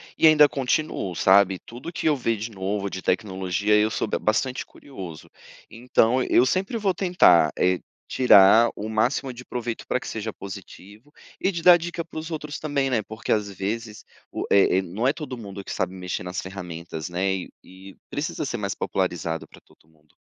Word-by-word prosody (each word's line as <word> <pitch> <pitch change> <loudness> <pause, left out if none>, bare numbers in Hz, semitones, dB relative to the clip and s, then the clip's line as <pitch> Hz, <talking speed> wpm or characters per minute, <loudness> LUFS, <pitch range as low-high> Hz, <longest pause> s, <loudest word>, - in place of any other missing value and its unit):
e 160 - +5
ainda 150 -2 +7
continuo, 130 - -2
sabe, 95 +1 +4
tudo 120 +7 -8
o - - -8
que 165 - -2
eu 150 - +4
ver 115 -4 -1
de 110 +3 -5
novo 100 0 -3
de 95 -1 -5
tecnologia, 95 +1 0
eu 105 +1 +3
sou 110 - -2
be - - -2
bastante 125 +4 0
curioso, 95 - -10 0.4
então 125 +1 +2
eu 125 0 +4
sempre 190 - -1
vou 200 -4 +1
tentar, 165 - +4
eh, 90 0 +2 0.3
tirar 115 -2 +6
o 105 - -5
máximo 125 +4 0
de 125 +1 -10
proveito 120 -2 -5
pra 125 - 0
que - - -9
seja 110 0 -4
positivo 100 +6 -11 0.3
e 190 - +2
de 170 -3 -5
dar 175 0 +8
dica 170 0 -5
para 160 - -7
os 160 - -7
outros 150 -2 -5
também, 140 -3 -1
né. 115 -4 +2
Porque 110 +2 -6
às 105 -2 +1
vezes 105 +3 -5 0.3
o - - -4
eh 100 -2 +5
eh, 95 - +3
não 105 +9 -2
é 140 - +3
todo 150 -6 -6
mundo 100 -4 -8
que - - -8
sabe 95 0 -2
mexer 90 -1 -4
nas 90 0 -4
ferramentas, 85 -4 -7
né. 90 +2 -2
E 95 - -5
e 95 +1 -14 0.2
precisa 150 +1 -3
ser 120 - -3
mais 100 -2 -3
popularizado 85 -3 -2
pra - - -17
todo 80 - -27
mundo. 75 -1 -31
110 Hz, 200 wpm, -24 LUFS, 95-135 Hz, 0.4 s, dar